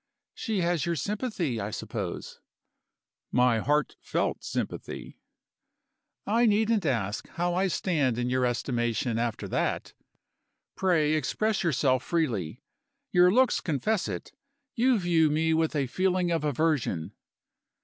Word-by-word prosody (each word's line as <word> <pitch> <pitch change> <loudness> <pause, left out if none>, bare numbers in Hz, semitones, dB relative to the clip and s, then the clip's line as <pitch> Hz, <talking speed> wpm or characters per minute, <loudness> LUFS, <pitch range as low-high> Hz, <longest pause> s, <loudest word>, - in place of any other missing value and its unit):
"She 215 -5 -2
has 170 -3 +1
your 170 - 0
sympathy, 200 - -2
I 100 - -3
suppose?" 105 -4 -5 0.9
"My 125 -2 +3
heart 150 +5 0
felt - - -1
sympathy." - - -5 1.1
"I 230 +3 +3
needn't 215 -3 +2
ask 105 -6 -1
how 175 +1 -1
I 190 +2 +2
stand 150 -10 0
in 120 0 -1
your 130 0 +1
estimation, 120 -2 0
after 115 -1 -2
that. - - -1 0.8
Pray 160 -5 +2
express 195 - 0
yourself 135 -6 +2
freely. 125 - -2 0.5
Your 180 -2 +6
looks 255 +4 +3
confess 180 - 0
it 90 -4 -5 0.4
you 250 +1 +3
view 170 -4 +3
me 160 +2 +2
with 160 0 +1
a 140 -2 +1
feeling 185 +5 0
of 165 -2 0
aversion." 145 - 0
155 Hz, 125 wpm, -28 LUFS, 125-185 Hz, 1.1 s, Your